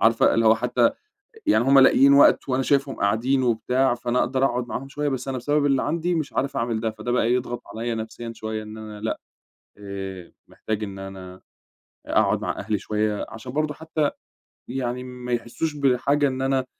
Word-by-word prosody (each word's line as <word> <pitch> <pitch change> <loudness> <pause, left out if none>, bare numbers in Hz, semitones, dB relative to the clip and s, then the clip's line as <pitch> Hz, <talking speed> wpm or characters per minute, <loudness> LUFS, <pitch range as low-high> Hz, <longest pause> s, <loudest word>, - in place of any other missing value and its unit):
عارفة 115 0 +4
اللي 115 0 +2
هو 110 - +7
حتّى 120 +1 +2 0.6
ي 310 - +5
يعني - - +4
همّ 135 +2 +6
لاقيين 135 +1 +6
وقت 140 0 +5
وأنا 130 +1 +1
شايفهم 140 0 +1
قاعدين 120 +7 +1
وبتاع، 125 +2 +1
فأنا 125 0 -1
أقدر 130 +2 +1
أقعد 125 -2 -1
معاهم 135 +3 -5
شويّة، 145 +1 -2
بس 130 -1 -4
أنا 130 -1 -2
بسبب 145 +4 +1
اللي 135 -2 +2
عندي 170 +1 0
مش 155 -3 -3
عارف 140 +1 -1
أعمل 115 -1 -1
ده، 110 -1 -1
فده 110 +3 -5
بقى 120 -1 +2
يضغط 120 -1 -2
عليَّ 115 +1 -2
نفسيًا 115 +1 -6
شويّة 110 0 -4
إن 105 +1 -9
أنا 110 -1 -8
لأ، 110 - -2 0.6
آآ، 95 -3 -7 0.2
محتاج 110 0 -4
إن 100 -1 -7
أنا 95 -1 -8
أ - - -22 0.7
أقعد - - +2
مع - - -3
أهلي 105 - -1
شويّة، 105 +1 -1
عشان 115 +3 -8
برضو 150 +1 -1
حتّى 155 -1 -1 0.6
يعني 125 -1 -3
ما 125 -1 -7
يحسُّوش 120 +6 -2
بحاجة 140 +1 +2
إن 130 -1 -3
أنا 135 -1 +1
125 Hz, 195 wpm, -24 LUFS, 110-135 Hz, 0.7 s, هو